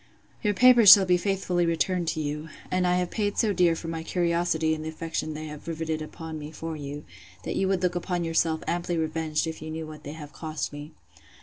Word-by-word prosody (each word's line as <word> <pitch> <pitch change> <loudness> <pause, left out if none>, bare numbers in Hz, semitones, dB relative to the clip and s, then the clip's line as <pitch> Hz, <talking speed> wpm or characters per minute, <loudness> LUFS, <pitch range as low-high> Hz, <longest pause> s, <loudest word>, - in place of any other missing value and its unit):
'Your 205 -1 +1
papers 240 -2 +8
shall 195 -1 +9
be 180 -1 +4
faithfully 180 -1 0
returned 170 0 0
you; 150 +1 -3 0.2
and 185 0 +2
I 180 - +3
have 180 -1 -1
paid 205 -2 -1
so 215 -3 +2
dear 175 -2 +3
for 165 - -7
my 165 0 -3
curiosity 170 -2 0
in 155 - -4
the 155 - -4
affection 160 -1 -4
they 155 +1 -6
have 150 0 -9
rivetted 160 -1 -3
upon 160 0 -7
me 150 0 -7
for 160 +1 -6
you, 145 0 -7 0.4
that - - -3
you 190 - +1
would 190 -1 0
look 180 -1 +2
upon 175 0 -2
yourself 165 -1 0
amply 175 0 -1
revenged 160 -1 -1
if 160 -1 -6
you 155 - -6
knew 160 0 -5
what 155 0 -10
they 145 - -7
have 150 -2 -10
cost 155 -3 -4
me. 145 +1 -9
165 Hz, 220 wpm, -26 LUFS, 155-180 Hz, 0.4 s, shall